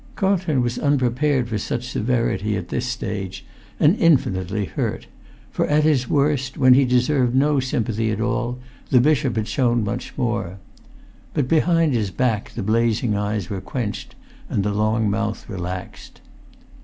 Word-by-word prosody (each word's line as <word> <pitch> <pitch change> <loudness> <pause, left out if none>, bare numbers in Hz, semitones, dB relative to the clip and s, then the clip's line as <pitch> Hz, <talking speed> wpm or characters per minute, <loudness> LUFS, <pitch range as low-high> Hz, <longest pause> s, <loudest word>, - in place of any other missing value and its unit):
Carlton 185 -9 +1
was 120 0 -2
unprepared 135 -1 +1
for 110 -2 -2
such 120 +4 -3
severity 110 -3 0
at 90 -1 -6
this 125 - -2
stage; 95 -7 -4 0.3
and 155 +6 +5
infinitely 105 - +2
hurt; 80 - -3 0.5
for - - 0
at 150 +1 +3
his 140 -6 +2
worst, 140 -3 +1
when 130 -1 +6
he 135 +1 +5
deserved 125 0 +2
no 145 +1 +3
sympathy 115 -3 -1
at 110 -1 -2
all, 125 +1 -1 0.3
the 125 - +5
bishop 140 -2 +2
had 110 -1 -1
shown 120 -4 +1
much 100 - -4
more. 115 -7 -2 0.8
But 140 -4 +1
behind 165 0 +3
his 110 -5 0
back 115 -1 -1
the - - -3
blazing 115 +1 +1
eyes 105 -2 -2
were 95 -2 -3
quenched, 115 -3 -5 0.3
and 100 - 0
the 105 0 -1
long 110 +1 +1
mouth 105 +1 -2
relaxed. 90 -1 -7
120 Hz, 155 wpm, -22 LUFS, 105-135 Hz, 0.8 s, when